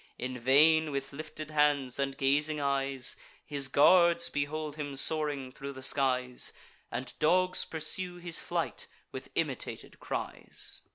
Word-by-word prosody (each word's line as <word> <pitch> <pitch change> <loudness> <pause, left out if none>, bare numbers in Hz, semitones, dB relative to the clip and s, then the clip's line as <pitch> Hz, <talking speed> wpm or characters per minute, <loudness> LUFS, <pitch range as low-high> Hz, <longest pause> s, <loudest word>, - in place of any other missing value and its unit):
In 125 0 -4
vain, 155 +5 +5
with 140 -1 -4
lifted 155 +1 -7
hands 145 -4 +2
and 135 -1 -1
gazing 145 +3 +2
eyes, 135 -2 0 0.3
His 140 -2 0
guards 170 +5 +5
behold 150 +1 -2
him 145 -2 -5
soaring 145 -2 0
thro' 140 +2 -7
the 130 -1 -9
skies, 130 -2 +1 0.4
And - - -5
dogs 185 +3 +3
pursue 175 +3 -2
his 175 -1 -1
flight 485 -1 -3 0.2
with - - -7
imitated - - -3
cries. - - -5
145 Hz, 130 wpm, -31 LUFS, 135-155 Hz, 0.4 s, vain